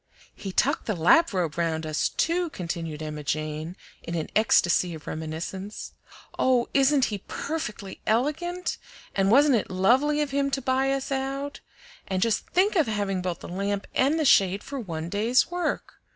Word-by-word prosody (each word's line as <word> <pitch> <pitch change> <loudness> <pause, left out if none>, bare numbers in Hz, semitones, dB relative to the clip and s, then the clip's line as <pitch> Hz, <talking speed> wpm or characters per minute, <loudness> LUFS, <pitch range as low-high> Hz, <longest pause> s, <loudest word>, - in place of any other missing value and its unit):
"He 195 - -6
tucked - - +1
the 215 - 0
lap 250 - +5
robe 175 -5 -1
round 160 -1 0
us, 155 -1 0
too," 345 +1 0
continued 165 - -5
Emma 150 -1 -5
Jane, 155 +3 -3 0.3
in 170 - -5
an 160 -2 -3
ecstasy 180 -5 +3
of 155 - -12
reminiscence. 165 +6 -5 0.5
"Oh! 250 -2 +3
isn't 275 0 +4
he 205 - -3
perfectly 215 - -5
elergant? 315 +10 0 0.4
And 195 0 +2
wasn't 275 +2 +6
it 210 - -3
lovely 255 +11 +3
of 285 - -5
him 280 0 +1
to 275 - -1
buy 265 +1 +1
us 275 0 -2
out? 275 +1 -3 0.5
And 190 -2 -1
just 220 +1 +1
think 395 +4 +2
of 320 -8 +3
having 200 -3 -1
both 180 -2 -3
the - - -8
lamp 200 +2 -2
and 285 +5 +2
the 310 - +1
shade 195 -5 +4
for 280 -1 -6
one 165 -7 -5
day's 220 - +2
work! 355 0 -3
210 Hz, 170 wpm, -26 LUFS, 175-275 Hz, 0.5 s, wasn't